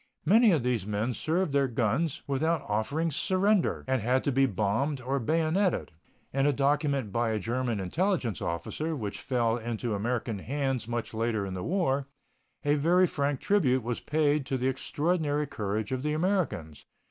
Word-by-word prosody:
Many 220 +6 +6
of 155 -8 +2
these 120 -6 0
men 105 +4 -1
served 165 - 0
their 140 -1 +3
guns 130 +7 0
without 155 +4 0
offering 140 +11 0
surrender, 185 +6 +1
and 130 -2 +1
had 125 +4 +1
to 140 - +1
be 135 +1 +3
bombed 110 +7 0
or 135 +2 -1
bayoneted. 165 - +1 0.4
In 135 +1 +2
a - - +4
document 140 -4 +1
by 115 +2 +1
a 110 - 0
German 120 +1 -1
intelligence 145 - -1
officer, 150 - -3
which 105 -7 -5
fell 120 -3 +1
into 115 0 -3
American 115 0 -2
hands 135 0 -2
much 120 -1 -3
later 110 -2 -1
in 95 - -5
the 90 - -4
war, 140 - 0 0.6
a 145 - +4
very 170 +5 +4
frank 140 -4 -1
tribute 140 - +2
was 120 0 -2
paid 150 -1 +1
to 135 - 0
the 130 +1 0
extraordinary 150 +2 0
courage 105 -4 -3
of 130 -1 -1
the 150 +2 -1
Americans. 155 - -1
135 Hz, 170 wpm, -29 LUFS, 115-155 Hz, 0.6 s, Many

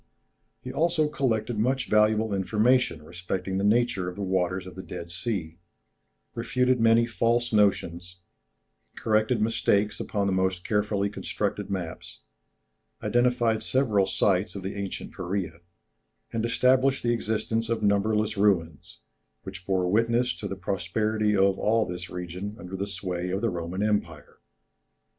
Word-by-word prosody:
] - - -47
He 125 - -6
had - - -12
also 165 -1 +2
collected 120 -6 -1
much 130 +4 +1
valuable 105 0 +3
information 105 -2 +2
respecting 90 +3 -4
the - - -1
nature 105 -4 +2
of 90 - -9
the 100 - -4
waters 95 0 0
of 95 - -9
the 95 - -7
Dead 85 -2 -8
Sea, 90 -3 -3 0.7
refuted 125 +1 +1
many 115 +1 +5
false 120 +1 0
notions, 90 -4 +1 0.8
corrected 110 +2 +1
mistakes 105 -2 +1
upon 100 -2 -1
the 100 - +1
most 95 -1 0
carefully 105 -1 0
constructed 100 - -3
maps, 90 -4 -6 0.8
identified 120 -2 +2
several 110 -8 +2
sites 95 0 +1
of 100 - -6
the 95 - -4
ancient 100 -1 -5
Peræa, 85 -3 -3 0.7
and 115 0 0
established 130 +3 +3
the 120 0 +2
existence 110 0 -1
of 115 -2 -1
numberless 105 +1 +1
ruins, 85 -7 0 0.4
which 90 - -9
bore 95 -2 +1
witness 115 +5 +2
to 100 - -5
the 100 - -4
prosperity 105 +3 0
of 95 0 +3
all 110 +1 +2
this 90 -1 -6
region 90 +4 -6
under 95 -5 -8
the 100 +1 -3
sway 90 -2 -3
of 95 +2 -2
the 115 -2 +1
Roman 90 +3 -3
Empire. 85 -8 -2
105 Hz, 145 wpm, -26 LUFS, 95-115 Hz, 0.8 s, many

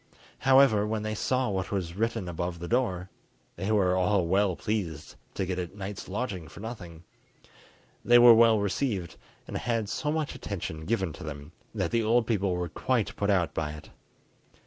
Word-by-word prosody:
However, 130 -6 +5
when 110 0 -2
they 110 0 -2
saw 130 +3 0
what 95 -3 -2
was 90 -4 -3
written 115 -2 -1
above 85 0 -3
the 85 +1 -6
door, 95 -7 -1 0.4
they 95 +5 -2
were 95 -4 +3
all 95 0 +2
well 95 +1 +2
pleased 85 -9 -3 0.2
to 95 - -1
get 90 0 -3
a 90 +2 -6
night's 100 0 -6
lodging 95 -5 -4
for - - -12
nothing. 90 -7 -8 1.0
They 120 0 +6
were 120 -1 +9
well 115 -1 +5
received, 100 - -2 0.3
and - - -4
had 115 -4 -1
so 150 - -2
much 155 -2 -2
attention 80 -5 -5
given 95 -6 -1
to - - -10
them, 75 -1 -7 0.2
that - - -1
the 115 -1 +2
old 115 +2 +2
people 100 -5 0
were 90 0 -2
quite 120 +6 -1
put 100 - -1
out 90 -4 +2
by 75 -2 -2
it. 75 - -12
100 Hz, 180 wpm, -28 LUFS, 90-115 Hz, 1.0 s, were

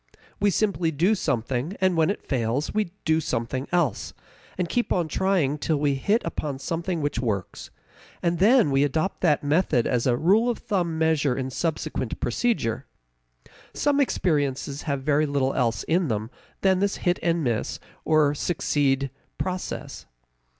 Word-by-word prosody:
We 205 - +3
simply 195 -4 +1
do 165 +7 +2
something, 135 - -2
and 185 -1 +2
when 160 0 +3
it 200 - -3
fails, 125 +2 -1
we 215 0 +1 0.2
do 160 0 +3
something 130 0 -2
else, 170 - 0 0.4
and 180 -1 0
keep 240 +7 -1
on 175 -3 +1
trying 160 -5 +1
till 155 +1 0
we 145 -1 +1
hit 205 - +1
upon 150 -4 -3
something 165 +4 -3
which 145 - -1
works, 100 -7 -3 0.5
and 170 -1 +1
then 220 - +5
we 135 +1 +3
adopt 155 +6 -1
that 150 -5 +2
method 145 -5 +2
as 125 -1 +1
a 120 -1 +2
rule 205 - +3
of 240 - -1
thumb 175 -6 -1
measure 155 -5 +2
in 130 -1 -3
subsequent 150 -6 -3
procedure. 130 - -1 0.9
Some 290 -1 +2
experiences 145 - 0
have 140 -1 -1
very 150 +1 +2
little 140 -2 0
else 115 -4 0
in 170 +1 +1
them 110 -1 -2 0.3
than 190 -1 +3
this 200 0 +1
hit 175 0 +2
and 170 -1 +1
miss 120 -4 -1 0.2
or 155 -2 +3
succeed 140 -4 0 0.3
process. 185 0 -4
155 Hz, 155 wpm, -25 LUFS, 135-180 Hz, 0.9 s, then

